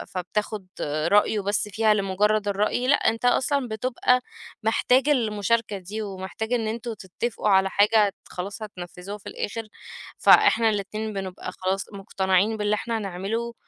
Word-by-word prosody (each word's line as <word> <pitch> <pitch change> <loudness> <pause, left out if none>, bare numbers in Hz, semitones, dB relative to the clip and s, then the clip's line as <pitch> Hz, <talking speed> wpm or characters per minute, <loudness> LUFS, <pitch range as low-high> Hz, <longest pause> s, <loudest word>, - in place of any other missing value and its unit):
فبتاخُد 200 +2 -3
رأيه 160 +9 +2
بس 205 +2 -1
فيها 215 +1 +3
لمجرّد 205 +1 +1
الرأي 210 +5 0
لأ 285 - +6
أنت 230 +2 0
أصلًا 265 +2 +2
بتبقى 250 +2 +1 0.4
محتاج 250 +5 +3
المشاركة 225 -4 +1
دي 200 +4 -6
ومحتاج 200 +3 -5
إن 230 -3 0
أنتم 230 +1 -4
تتفقوا 210 +3 -3
على 190 0 +4
حاجة 210 +1 +4
ت - - -15 0.2
خلاص 200 +5 -6
هتنفّذوها 180 0 -8
في 205 - -10
الآخر، 225 +2 -5 0.5
فإحنا 225 0 +6
الاتنين 215 +1 -3
بنبقى 190 -2 -5
خلاص 190 +1 -2
مقتنعين 195 +2 +1
باللي 210 0 +1
إحنا 230 +2 -2
هنعمله، 210 +4 -3
210 Hz, 140 wpm, -25 LUFS, 195-225 Hz, 0.5 s, لأ